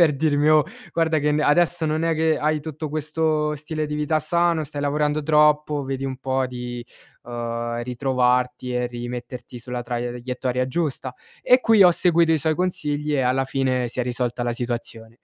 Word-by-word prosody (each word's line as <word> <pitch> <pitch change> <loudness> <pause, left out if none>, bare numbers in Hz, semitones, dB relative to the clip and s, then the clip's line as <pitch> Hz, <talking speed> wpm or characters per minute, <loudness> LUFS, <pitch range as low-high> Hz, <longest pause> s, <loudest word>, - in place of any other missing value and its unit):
per 160 -4 +5
dirmi: 145 +1 +2
"Oh, 155 -1 +6 0.3
guarda, 165 -1 +1
che 150 0 +1
n 150 - +1
adesso 170 +3 +2
non 155 +1 0
è 165 0 +1
che 160 0 +1
hai 155 0 0
tutto 155 0 -6
questo 155 0 -1
stile 155 +1 -4
di 150 0 -4
vita 150 +1 0
sano, 170 +1 +2
stai 145 -1 -6
lavorando 150 +1 0
troppo, 150 -1 +3
vedi 135 0 -4
un 130 -1 -4
po' 130 0 -1
di, 120 -1 -6 0.4
ehm, 120 0 -4
ritrovarti 125 0 0
e 125 0 0
rimetterti 120 0 -7
sulla 125 +1 -5
traiettoria 125 +1 -3
giusta!" 140 -4 -2 0.3
E 250 - +6
qui 225 -5 +5
ho 180 - +8
seguito 170 -1 +3
i 160 - +3
suoi 155 +2 +1
consigli 150 -4 -1
e 140 - +2
alla 130 +1 +1
fine 130 -2 0
si 120 - -10
è 125 - +1
risolta 125 -1 -2
la 120 - 0
situazione. 120 -1 -5
145 Hz, 180 wpm, -23 LUFS, 125-155 Hz, 0.4 s, ho